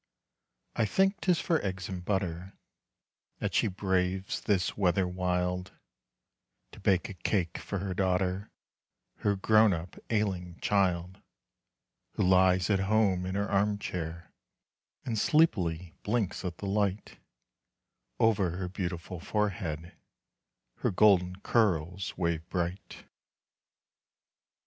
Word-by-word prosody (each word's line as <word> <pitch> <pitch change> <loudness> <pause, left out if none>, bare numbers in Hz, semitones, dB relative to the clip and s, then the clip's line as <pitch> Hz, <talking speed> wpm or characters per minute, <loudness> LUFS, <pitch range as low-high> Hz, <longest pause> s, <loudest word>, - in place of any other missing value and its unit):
I 115 -2 +2
think 195 - +2
'tis 180 -3 +2
for 165 -2 +1
eggs 95 -1 -3
and 90 -2 -5
butter 95 -1 -2 0.8
That - - -3
she - - +3
braves 95 -1 -1
this 95 -4 0
weather 95 -1 +2
wild, 90 0 -1 1.0
To - - -13
bake 95 -3 +2
a 100 - -7
cake 90 -2 -1
for 100 - -4
her 95 0 -3
daughter, 95 +1 0 0.7
Her 100 -1 +1
grown 110 +1 +4
up 85 +1 -6
ailing 95 -5 -1
child. 95 -2 0 0.9
Who - - 0
lies 90 -1 +4
at 100 - +3
home 95 -2 +2
in 95 - -3
her 100 +1 0
arm 100 +1 +1
chair, 85 -4 -5 0.7
And 115 -4 -1
sleepily 90 - +2
blinks 105 -4 -1
at 90 -2 -4
the - - -6
light. 100 0 -1 1.0
Over 100 -6 +2
her 90 -1 -3
beautiful 90 -2 -4
forehead 90 -5 -2 0.8
Her - - 0
golden 90 -2 +4
curls 95 -4 0
wave 85 -1 -1
bright. 90 +2 -4
95 Hz, 115 wpm, -30 LUFS, 90-100 Hz, 1.0 s, grown